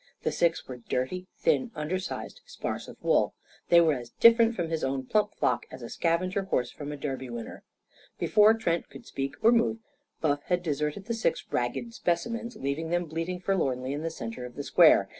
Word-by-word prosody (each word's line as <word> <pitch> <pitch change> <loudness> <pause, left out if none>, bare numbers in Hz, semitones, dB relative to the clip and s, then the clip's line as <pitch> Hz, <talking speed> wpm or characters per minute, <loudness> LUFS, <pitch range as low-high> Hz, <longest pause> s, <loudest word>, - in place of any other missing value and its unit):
The - - +1
six 170 -1 +1
were 130 - -6
dirty, 130 +9 -3
thin, 250 - +2
undersized, 175 +5 -4
sparse - - -4
of - - -11
wool. - - +2 0.3
They 170 - +8
were 165 -2 +4
as 120 -3 -6
different 230 - +6
from 175 -5 -2
his 160 -1 -1
own 135 0 -1
plump 210 +8 +1
flock - - 0
as 130 -1 -10
a 115 - -7
scavenger 185 +3 0
horse 125 -10 0
from 145 0 -7
a 145 - -5
Derby 135 -3 -4
winner. 120 -1 -7 0.6
Before 215 +1 +5
Trent 170 -7 -1
could 135 - -12
speak 135 +1 -4
or 230 - +7
move, 230 -1 +3 0.4
Buff 145 -2 +1
had 180 -1 0
deserted 150 +3 -2
the 230 - -2
six 225 -7 0
ragged 125 - -2
specimens, 230 +5 -2
leaving 155 -1 -3
them 175 +1 +1
bleating 165 +3 -3
forlornly 135 -9 0
in 145 - -3
the 165 - -2
centre 115 -5 -6
of 125 0 -8
the 145 - -4
square. 155 - +6
165 Hz, 195 wpm, -28 LUFS, 135-190 Hz, 0.6 s, They